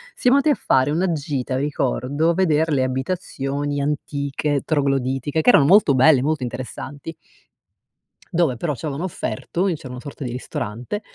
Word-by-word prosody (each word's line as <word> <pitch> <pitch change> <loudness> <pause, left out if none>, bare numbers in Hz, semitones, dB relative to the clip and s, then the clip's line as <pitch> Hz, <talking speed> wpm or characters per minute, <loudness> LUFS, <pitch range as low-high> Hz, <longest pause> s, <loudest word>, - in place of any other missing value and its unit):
siamo 255 +2 +4
andati 300 +2 +2
a - - +3
fare 130 +1 +2
una 175 +3 +1
gita, 140 -4 -2
ricordo 145 - 0
a 170 - +3
veder 160 -3 +2
le 135 -3 +2
abitazioni 140 0 -2
antiche 145 0 -2
trogloditiche 135 0 0
che 245 - +4
erano 140 - +6
molto 170 -5 +5
belle, 130 0 +5
molto 150 -1 -1
interessanti 135 +5 -6 1.2
dove 165 -8 +1
però 150 +1 -2
ci 120 - -8
avevano 150 +4 -3
offerto, 170 - -3
lì 180 -4 +1
c'era 135 -3 -10
una 125 - -7
sorta 145 0 -8
di 125 - -4
ristorante, 125 - -5
145 Hz, 160 wpm, -21 LUFS, 130-160 Hz, 1.2 s, erano